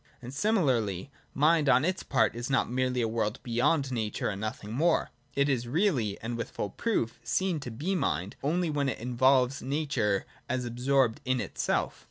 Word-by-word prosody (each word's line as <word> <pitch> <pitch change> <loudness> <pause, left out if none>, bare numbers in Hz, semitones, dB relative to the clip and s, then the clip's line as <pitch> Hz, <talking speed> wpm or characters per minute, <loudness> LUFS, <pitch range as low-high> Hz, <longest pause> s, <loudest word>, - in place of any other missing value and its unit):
And 125 +1 -9
similarly, 140 - +1 0.2
Mind 155 0 +4
on 130 +3 +5
its 185 +1 0
part 135 -3 +1
is 120 +2 -4
not 135 - +2
merely 125 0 0
a - - +1
world 110 -1 -1
beyond 135 +4 +1
Nature 110 -4 -1
and 100 -1 -4
nothing 110 0 -5
more: 165 +7 +2 0.2
it 140 0 +3
is 125 -4 0
really, 135 - +1
and 115 +1 -3
with 115 -1 -4
full 100 - -4
proof, 120 - -1
seen 185 -4 0
to 135 - -6
be 150 +12 -2
mind, 100 - -1
only 165 +3 0
when 145 -2 0
it 125 - -3
involves 125 +2 +2
Nature 130 -8 0 0.2
as 125 0 -1
absorbed 125 0 +1
in 130 -1 +1
itself. - - -1
130 Hz, 180 wpm, -29 LUFS, 115-145 Hz, 0.2 s, on